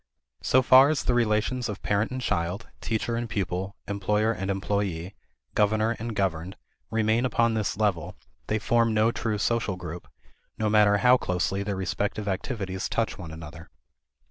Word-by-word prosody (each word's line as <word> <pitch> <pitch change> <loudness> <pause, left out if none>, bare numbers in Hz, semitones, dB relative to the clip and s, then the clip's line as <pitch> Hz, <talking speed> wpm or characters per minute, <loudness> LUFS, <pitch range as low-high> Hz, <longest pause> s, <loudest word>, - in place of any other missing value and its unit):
So 130 0 +3
far 130 +3 +7
as 155 -3 0
the 125 - +1
relations 115 +1 +1
of 105 -1 -6
parent 105 +2 +1
and 130 - -4
child, 90 -1 -2
teacher 115 +1 -1
and 120 0 -3
pupil, 95 -1 -3
employer 105 +2 +1
and 95 -3 -4
employee, 95 -2 -2 0.4
governor 110 +2 +2
and 115 0 -4
governed, 95 -2 -1 0.3
remain 110 +1 +1
upon 115 -2 +2
this 105 -3 -1
level, 100 -7 0 0.3
they 110 - +1
form 115 +1 +2
no 110 +2 +3
true 110 -3 -2
social 115 -2 0
group, 90 -1 -8 0.5
no 110 -1 0
matter 105 -1 +5
how 125 +4 +5
closely 95 -1 -1
their 100 0 -2
respective 100 +2 -2
activities 95 -1 -3
touch 115 -3 -1
one 85 -4 -7
another. 80 0 -10
105 Hz, 160 wpm, -26 LUFS, 95-115 Hz, 0.5 s, far